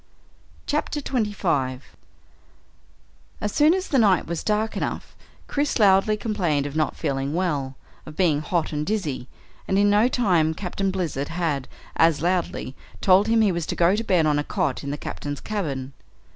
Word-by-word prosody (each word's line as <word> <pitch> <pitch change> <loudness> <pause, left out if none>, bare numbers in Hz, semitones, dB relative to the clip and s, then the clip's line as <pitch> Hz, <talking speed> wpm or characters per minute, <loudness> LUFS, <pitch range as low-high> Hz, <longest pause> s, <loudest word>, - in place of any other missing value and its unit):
CHAPTER 295 0 -1
25 190 - -2 1.4
As 210 -1 -2
soon 305 - +4
as 380 0 -3
the 270 - +3
night 195 -6 +4
was 170 0 -4
dark 215 +1 0
enough, - - -4 0.3
Chris 290 0 0
loudly 205 0 +4
complained 180 -11 0
of 145 0 -5
not 155 -1 0
feeling 140 -1 -2
well 145 -7 -1 0.3
of 155 - -9
being 155 -5 +2
hot 160 0 -1
and 150 0 -1
dizzy, 155 - -2 0.4
and 190 - +1
in 205 0 +4
no 210 +3 +4
time 175 -11 +2
Captain 195 +2 -2
Blizzard 170 -7 -2
had, 160 -6 -2 0.3
as 165 -2 +4
loudly, 175 -7 -1 0.2
told 195 +2 +4
him 225 0 +3
he 210 -3 +4
was 170 -2 -3
to - - -2
go 175 +3 +3
to 225 - -2
bed 180 -7 +2
on 150 -1 +2
a - - -1
cot 150 -7 -2
in 140 - -4
the 145 - -3
Captain's 145 -1 -5
cabin. 140 -11 -4
175 Hz, 170 wpm, -24 LUFS, 150-210 Hz, 1.4 s, soon